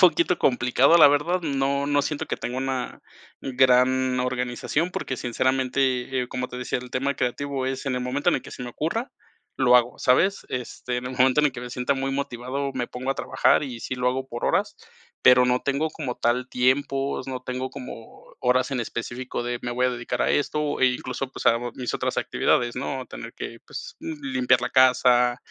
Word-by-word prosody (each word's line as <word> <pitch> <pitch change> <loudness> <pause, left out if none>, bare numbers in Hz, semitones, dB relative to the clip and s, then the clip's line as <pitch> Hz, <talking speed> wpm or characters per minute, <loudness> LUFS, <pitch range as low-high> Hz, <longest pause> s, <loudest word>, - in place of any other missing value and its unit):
poquito 175 -1 +4
complicado, 125 +4 +4
la 160 - +9
verdad, 150 +6 +1
no 140 -2 0
no 145 0 +2
siento 145 +1 -3
que - - -3
tengo 125 +1 -4
una 130 -1 -3 0.4
gran 130 0 +3
organización 125 +6 -1
porque, 130 -7 -4
sinceramente, 130 +1 0
eh, 125 - -6
como 125 0 -4
te 125 - -8
decía, 125 - -2
el 125 0 -10
tema 135 +3 -1
creativo 135 +1 -2
es 130 0 -3
en 135 -2 -1
el 125 - -2
momento 130 +6 0
en - - +2
el - - -5
que - - -11
se 125 - -8
me 120 - -5
ocurra, 195 - -3 0.4
lo 125 -2 +5
hago, 120 0 +1
¿sabes? 190 +10 +2
Este, 125 0 -4
en 125 - -4
el - - -4
momento 130 +3 +4
en 150 - +4
el 145 - -1
que 125 - -7
me 125 - -6
sienta 125 +2 -1
muy 135 0 -2
motivado, 135 0 -3
me 120 - -2
pongo 130 +2 -4
a - - 0
trabajar - - +2
y 125 -4 -7
sí 130 - -4
lo 125 0 +1
hago 130 +1 -2
por 120 -2 -4
horas, - - 0 0.4
pero 125 0 +7
no 125 0 +2
tengo 140 +3 -1
como 140 -6 -4
tal 125 +2 0
tiempos, 135 +2 0
no 130 -1 -5
tengo 130 +1 -4
como 125 -4 -11
horas 125 +1 +2
en 130 -3 -1
específico 120 +2 -4
de 120 0 -3
me 120 - -4
voy 125 +1 +1
a - - +1
dedicar 120 -1 -3
a - - +1
esto, 150 0 0
e 130 - +6
incluso, 130 +1 -2
pues, - - -8
hago 120 +1 +3
a - - -10
mis 125 -2 -4
otras - - -2
actividades, 120 -1 +1
¿no? 135 0 -3
A - - -10
tener - - -9
que, - - -7
pues, - - -8
m 160 - -5
limpiar 130 -2 +2
la - - -2
casa. 125 -1 +4
130 Hz, 215 wpm, -24 LUFS, 125-140 Hz, 0.4 s, la